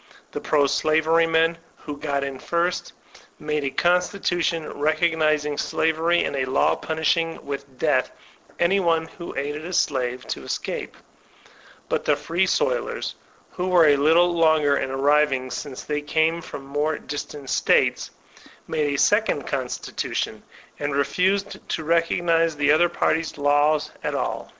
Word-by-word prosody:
The - - -5
pro 150 -2 +2
shvery 160 +3 +2
men, 165 +1 +2 0.2
who 150 - -7
got 140 -1 -2
in 135 -1 -5
first, 170 +4 -1 0.4
made 150 -1 -2
a 140 - 0
constitution 175 -1 0
recognizing 155 -1 +1
slavery, 165 +2 +1
and - - -2
a 130 -1 0
law 130 +1 +2
punishing 165 +1 -1
with 140 -2 -7
death 130 -3 +1 0.5
any 180 +3 +3
one 165 -3 +1
who 170 - -9
aided 145 +2 -3
a 180 +2 -6
slave 130 -6 0
to - - -3
escape; - - -4 0.9
but - - -1
the 150 - +2
Free 165 +6 0
Soilers, - - -1 0.4
who 180 0 -3
were 180 -3 +5
a 145 - +5
little 165 +5 +4
longer 155 -4 +3
in 135 -1 -2
arriving, 135 -1 +2
since 135 -3 -6
they 150 0 -2
came 160 +3 +1
from 135 - -9
more 145 +2 -1
distant 145 -1 -7
States, - - +2 0.6
made 150 -2 0
a 140 - -1
second - - +2
constitution, - - -3 0.4
and 145 -1 -2
refused 190 +8 0
to 160 - -2
recognize 165 0 +2
the 145 0 +2
other 170 +3 +4
party's 160 -2 -1
laws 145 +1 +2
at - - -2
all. - - -3
155 Hz, 145 wpm, -23 LUFS, 145-170 Hz, 0.9 s, were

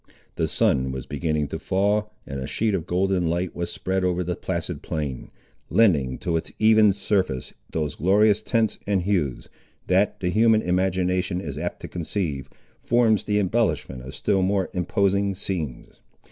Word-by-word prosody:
The - - 0
sun 65 0 +2
was 65 0 -5
beginning 75 -1 -1
to - - -4
fall, 105 +2 0
and 70 -1 -5
a 65 - -4
sheet 110 -1 0
of 90 -3 -2
golden 90 -1 +1
light 85 +2 -1
was 85 0 -3
spread 95 0 -2
over 90 0 +1
the 90 0 -2
placid 85 -3 -3
plain, 75 -7 -4 0.4
lending 75 - +3
to 85 -2 0
its 80 - -5
even 110 -1 +5
surface 95 - -1 0.2
those 75 -3 -2
glorious 105 +5 +3
tints 110 -1 0
and 100 -3 +1
hues, 85 -10 -1 0.4
that, 95 +2 +2
the 90 - -1
human 110 +2 +4
imagination 90 0 0
is 75 -7 -5
apt 85 +4 -4
to - - -6
conceive, 85 -5 -3 0.3
forms 115 -3 +2
the 105 - +1
embellishment 95 - 0
of 65 +1 -9
still 100 -2 +1
more 95 0 0
imposing 100 +2 +1
scenes. 90 -9 -5
90 Hz, 160 wpm, -24 LUFS, 80-100 Hz, 0.4 s, even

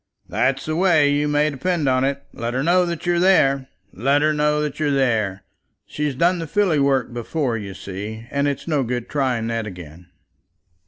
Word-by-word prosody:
"That's 135 +1 0
the 155 - -2
way, 165 -5 +4
you 145 +1 +1
may 150 +1 +2
depend 155 +2 -1
on 130 0 +2
it. 140 +1 -1
Let 120 +1 -4
her 130 - 0
know 175 +2 +3
that 170 0 -4
you're 175 0 +2
there. 140 -8 +3 0.3
Let 140 +8 +2
her 155 0 +3
know 150 0 +1
that 150 -1 -4
you're 155 -1 +1
there. 110 -8 0 0.4
She's 150 -2 -3
done 175 +5 +2
the 165 - -4
filly 180 -3 +2
work 135 -3 +1
before, 120 +2 -2
you 100 -3 -6
see; 105 +4 -7
and 140 0 0
it's 140 +2 -3
no 150 -4 +1
good 120 -1 -3
trying 130 -6 -1
that 115 -1 -2
again." 90 -3 -11
140 Hz, 195 wpm, -21 LUFS, 120-155 Hz, 0.4 s, way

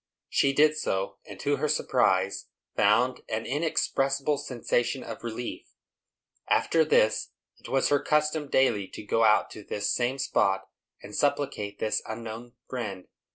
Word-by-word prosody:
She 140 - +3
did 150 +2 +4
so; 95 -10 -2
and, - - -10
to - - +1
her - - 0
surprise, - - +1 0.3
found 120 +5 +3
an 110 +1 -2
inexpressible 140 -1 0
sensation 125 -1 -1
of - - -8
relief. 120 +1 -5 0.8
After 165 -1 +3
this, 110 -8 +2 0.3
it - - -11
was 135 0 +2
her 145 - +4
custom 150 0 +1
daily 115 -7 +2
to - - -9
go 115 +2 +1
out 110 -1 +4
to 105 - -9
this 105 0 -2
same 125 +2 0
spot, 95 -7 +1 0.4
and 105 +1 -9
supplicate 140 -8 -1
this 110 - 0
unknown 115 +1 -7
Friend. 105 -8 -5
120 Hz, 145 wpm, -27 LUFS, 110-140 Hz, 0.8 s, did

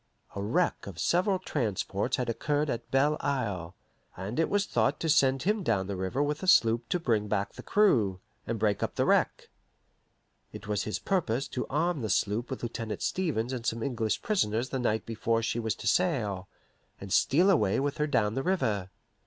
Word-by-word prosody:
A 100 - -3
wreck 125 - 0
of 95 -5 -8
several 185 - +2
transports 105 - -2
had 125 -2 -2
occurred 145 +5 0
at 115 0 -5
Belle 145 +3 +2
Isle, 100 -11 -2 0.4
and 100 - -4
it 165 - +2
was 205 0 +1
thought 120 +1 +1
to 160 - -1
send 135 -3 +3
him 210 +4 +1
down 110 - 0
the 100 +1 -4
river 95 +10 -1
with 145 0 -2
a 190 - -4
sloop 115 -9 +4
to 180 - +1
bring 110 -9 0
back 100 -1 -1
the - - -9
crew, 115 - +2 0.3
and 115 - -1
break 105 -1 +1
up - - -2
the - - +1
wreck. - - +1 1.0
It 105 - -10
was 105 -1 -1
his 105 - -2
purpose 140 -9 -1
to 125 - -3
arm 160 +1 0
his 110 -3 +1
sloop 105 +4 -1
with 130 - -5
Lieutenant 115 -2 -4
Stevens 130 -10 -1
and 125 -3 -4
some 115 0 -1
English 115 -6 -1
prisoners 130 - 0
the 135 - -2
night 110 -3 0
before 115 0 -1
she 115 +1 -1
was 110 -2 -1
to - - -10
sail, 115 - +1 0.5
and 100 -1 -5
steal 180 +8 +4
away 105 - +2
with 140 +1 -2
her 150 - +1
down 105 -7 +1
the 135 - -1
river. 110 - 0
120 Hz, 195 wpm, -29 LUFS, 105-150 Hz, 1.0 s, sloop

